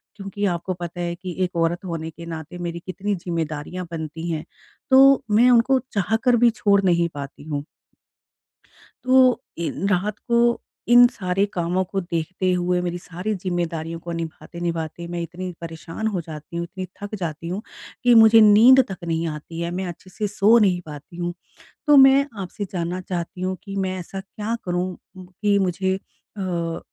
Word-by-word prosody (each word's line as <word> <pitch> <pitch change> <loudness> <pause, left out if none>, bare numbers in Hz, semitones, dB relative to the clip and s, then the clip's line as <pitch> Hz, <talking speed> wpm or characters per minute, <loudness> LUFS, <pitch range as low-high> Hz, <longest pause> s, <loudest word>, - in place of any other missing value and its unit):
क्योंकि 200 0 -4
आपको 180 0 -1
पता 175 0 -6
है 170 0 -2
कि 180 -1 -7
1 180 -1 -3
औरत 170 +2 0
होने 165 -2 -4
के 165 +2 -11
नाते 165 +1 -7
मेरी 170 -1 -4
कितनी 195 +2 -2
ज़िम्मेदारियाँ 170 0 -4
बनती 160 +1 -5
हैं। 155 0 -3 0.5
तो 270 0 +7
मैं 235 +4 +6
उनको 250 +3 +4
चाहकर 220 +5 +2
भी 240 0 +5
छोड़ 200 -1 +4
नहीं 170 -2 +3
पाती 140 0 -7
हूँ। 145 -2 -3 1.4
तो 255 -1 +5 0.2
इन 170 +2 -2
रात 200 +2 0
को 235 0 +1 0.5
इन 245 0 +10
सारे 195 -2 0
कामों 175 +2 0
को 195 +1 -3
देखते 175 +2 -2
हुए 180 0 +1
मेरी 175 0 -2
सारी 180 +5 -4
ज़िम्मेदारियों 170 -3 -3
को 170 - -7
निभाते-निभाते 165 0 -5
मैं 170 0 -4
इतनी 180 +2 -5
परेशान 165 +5 -5
हो 190 -5 -1
जाती 155 +1 -10
हूँ, 170 - -1
इतनी 185 +2 -6 0.2
थक 205 +1 -5
जाती 165 -1 -4
हूँ 185 +4 -3 0.4
कि 245 -1 +6
मुझे 225 0 +8
नींद 225 +6 +8
तक 185 - -5
नहीं 165 0 -1
आती 155 +2 -6
है, 170 0 -2
मैं 185 +1 -3
अच्छे 175 +2 -9
से 210 +3 -3
सो 215 +3 +4
नहीं 185 -4 +2
पाती 150 +2 -10
हूँ। 175 0 -2 0.5
तो 295 -1 +7
मैं 270 +1 +7 0.2
आपसे 200 +3 -5
जानना 175 +1 -2
चाहती 180 0 -5
हूँ 185 0 -1
कि 195 -2 -7
मैं 190 -1 -1
ऐसा 190 +2 -7
क्या 215 +3 -4
करूँ 180 +1 -1 0.3
कि 200 +3 0
मुझे 190 0 0
अ, 175 -4 -5
180 Hz, 170 wpm, -23 LUFS, 170-200 Hz, 1.4 s, इन